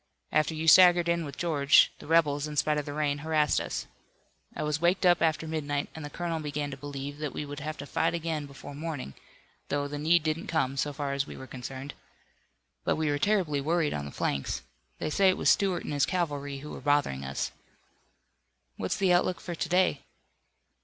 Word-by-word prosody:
"After 155 Hz, +1 st, +2 dB
you 160 Hz, +1 st, -3 dB
staggered 175 Hz, +1 st, +7 dB
in 170 Hz, 0 st, +1 dB
with 140 Hz, -2 st, -8 dB
George, 145 Hz, -5 st, +4 dB
the -, -, -11 dB
rebels, 150 Hz, -3 st, +3 dB
in 150 Hz, -, -6 dB
spite 150 Hz, +1 st, +2 dB
of 150 Hz, -, -6 dB
the 145 Hz, -, -4 dB
rain, 145 Hz, -1 st, 0 dB
harassed 155 Hz, -1 st, +2 dB
us. -, -, -4 dB, 0.7 s
I -, -, -3 dB
was 150 Hz, +1 st, -1 dB
waked 180 Hz, +2 st, +2 dB
up 175 Hz, -1 st, +5 dB
after 160 Hz, 0 st, +1 dB
midnight, 145 Hz, -2 st, -2 dB
and 160 Hz, -, -8 dB
the 145 Hz, -, -5 dB
colonel 165 Hz, +1 st, -3 dB
began 145 Hz, -1 st, -3 dB
to -, -, -5 dB
believe 145 Hz, +1 st, -6 dB
that 150 Hz, -3 st, -3 dB
we 150 Hz, -, -4 dB
would 145 Hz, 0 st, -7 dB
have 155 Hz, +1 st, -5 dB
to 140 Hz, -, -7 dB
fight 155 Hz, -, 0 dB
again 160 Hz, -3 st, -3 dB
before 140 Hz, +1 st, -10 dB
morning, 145 Hz, -, -5 dB, 0.6 s
though 145 Hz, 0 st, 0 dB
the 145 Hz, 0 st, -5 dB
need 165 Hz, +2 st, +3 dB
didn't 155 Hz, +1 st, -2 dB
come, 135 Hz, -5 st, 0 dB
so 145 Hz, +2 st, -1 dB
far 140 Hz, -1 st, -3 dB
as 140 Hz, 0 st, -1 dB
we -, -, -9 dB
were 130 Hz, -, -8 dB
concerned. 130 Hz, +2 st, -7 dB, 0.9 s
But -, -, +1 dB
we 155 Hz, -2 st, 0 dB
were 145 Hz, -, 0 dB
terribly 180 Hz, -7 st, +1 dB
worried 160 Hz, +1 st, +1 dB
on 70 Hz, -, -3 dB
the 70 Hz, -, -7 dB
flanks. 70 Hz, -2 st, -2 dB, 0.3 s
They 155 Hz, -, -3 dB
say 195 Hz, +3 st, +4 dB
it 185 Hz, -, +2 dB
was -, -, +4 dB
Stuart 190 Hz, -3 st, +1 dB
and -, -, -4 dB
his 145 Hz, -, +2 dB
cavalry 145 Hz, -6 st, -2 dB
who 150 Hz, -, -8 dB
were -, -, -8 dB
bothering 145 Hz, -, +1 dB
us." 65 Hz, +1 st, -3 dB, 1.3 s
"What's 95 Hz, -, -2 dB
the 190 Hz, -2 st, +3 dB
outlook 175 Hz, +1 st, +2 dB
for 175 Hz, -, -6 dB
to 165 Hz, 0 st, -3 dB
day?" 180 Hz, -5 st, +2 dB
150 Hz, 210 wpm, -29 LUFS, 145-165 Hz, 1.3 s, staggered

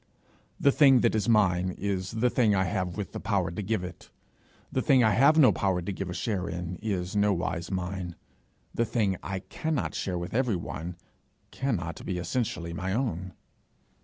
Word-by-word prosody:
The 140 Hz, -, +5 dB
thing 135 Hz, -4 st, +6 dB
that -, -, +3 dB
is 110 Hz, +1 st, 0 dB
mine 95 Hz, -4 st, +3 dB
is 95 Hz, -2 st, -2 dB
the 120 Hz, +3 st, +1 dB
thing 110 Hz, -5 st, +3 dB
I 95 Hz, -, +3 dB
have 90 Hz, -2 st, -2 dB
with 105 Hz, -, -4 dB
the -, -, -5 dB
power 95 Hz, -5 st, 0 dB
to 90 Hz, -, -4 dB
give 105 Hz, -1 st, -1 dB
it. 90 Hz, -1 st, -9 dB, 0.6 s
The 130 Hz, -, 0 dB
thing 130 Hz, -1 st, +4 dB
I 110 Hz, -, +4 dB
have 140 Hz, +8 st, +5 dB
no 145 Hz, -5 st, +7 dB
power 95 Hz, -2 st, 0 dB
to 90 Hz, +3 st, -4 dB
give 95 Hz, 0 st, -4 dB
a -, -, -3 dB
share 95 Hz, -6 st, -2 dB
in, 85 Hz, +1 st, -4 dB
is 95 Hz, -3 st, -3 dB
nowise 95 Hz, -4 st, 0 dB
mine; 90 Hz, -2 st, -3 dB, 0.6 s
the 115 Hz, -, +1 dB
thing 105 Hz, -5 st, 0 dB
I 95 Hz, 0 st, -4 dB
cannot 155 Hz, +6 st, -2 dB
share 90 Hz, -2 st, -2 dB
with 85 Hz, +1 st, -5 dB
everyone, 90 Hz, -8 st, -2 dB, 0.5 s
cannot 90 Hz, -12 st, -2 dB
be 95 Hz, -, -3 dB
essentially 85 Hz, -3 st, -2 dB
my 95 Hz, +2 st, -2 dB
own. 95 Hz, -7 st, -2 dB
95 Hz, 180 wpm, -28 LUFS, 90-115 Hz, 0.6 s, no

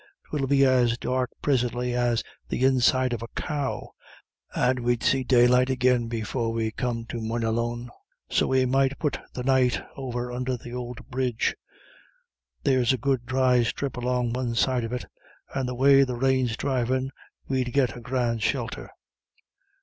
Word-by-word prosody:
'Twill 140 Hz, -3 st, -1 dB
be 140 Hz, 0 st, +4 dB
as 125 Hz, -3 st, +3 dB
dark 125 Hz, 0 st, -1 dB
prisintly 125 Hz, -2 st, 0 dB
as 120 Hz, -1 st, +1 dB, 0.3 s
the 130 Hz, -, +1 dB
inside 130 Hz, -1 st, +3 dB
of 115 Hz, -, -3 dB
a 115 Hz, -, -5 dB
cow, 145 Hz, -3 st, -3 dB, 0.6 s
and 125 Hz, +1 st, +2 dB
we'd 120 Hz, -1 st, 0 dB
see 135 Hz, 0 st, +2 dB
daylight 125 Hz, 0 st, +4 dB
agin 125 Hz, -2 st, +2 dB
before 115 Hz, +1 st, -2 dB
we 115 Hz, -1 st, -1 dB
come 115 Hz, 0 st, -3 dB
to 115 Hz, 0 st, -5 dB
Moynalone. 115 Hz, +1 st, -1 dB, 0.4 s
So -, -, +1 dB
we 130 Hz, -1 st, +3 dB
might 135 Hz, +2 st, +2 dB
put 150 Hz, -4 st, -1 dB, 0.2 s
the 125 Hz, -, -3 dB
night 130 Hz, -1 st, +3 dB, 0.2 s
over 125 Hz, -2 st, -4 dB
under 125 Hz, +1 st, -2 dB
th'ould 120 Hz, 0 st, -7 dB
bridge. 125 Hz, -3 st, 0 dB, 1.1 s
There's 130 Hz, -3 st, +3 dB
a -, -, 0 dB
good 130 Hz, -3 st, -1 dB
dry 130 Hz, -1 st, +3 dB
strip 130 Hz, +4 st, -2 dB
along 125 Hz, -1 st, -1 dB
the 125 Hz, -, -2 dB
one 120 Hz, -2 st, -2 dB
side 125 Hz, +1 st, +2 dB
of 115 Hz, -, -6 dB
it, 125 Hz, -1 st, -3 dB, 0.5 s
and 130 Hz, -2 st, -1 dB
the 125 Hz, -, -4 dB
way 135 Hz, +2 st, +6 dB
the 125 Hz, -2 st, -2 dB
rain's 130 Hz, -2 st, +1 dB
dhrivin' 130 Hz, 0 st, 0 dB, 0.4 s
we'd 130 Hz, -2 st, -1 dB
git 130 Hz, -3 st, +1 dB
a -, -, -8 dB
grand 120 Hz, -2 st, -1 dB
shelter." 120 Hz, -3 st, -2 dB
125 Hz, 160 wpm, -26 LUFS, 120-130 Hz, 1.1 s, way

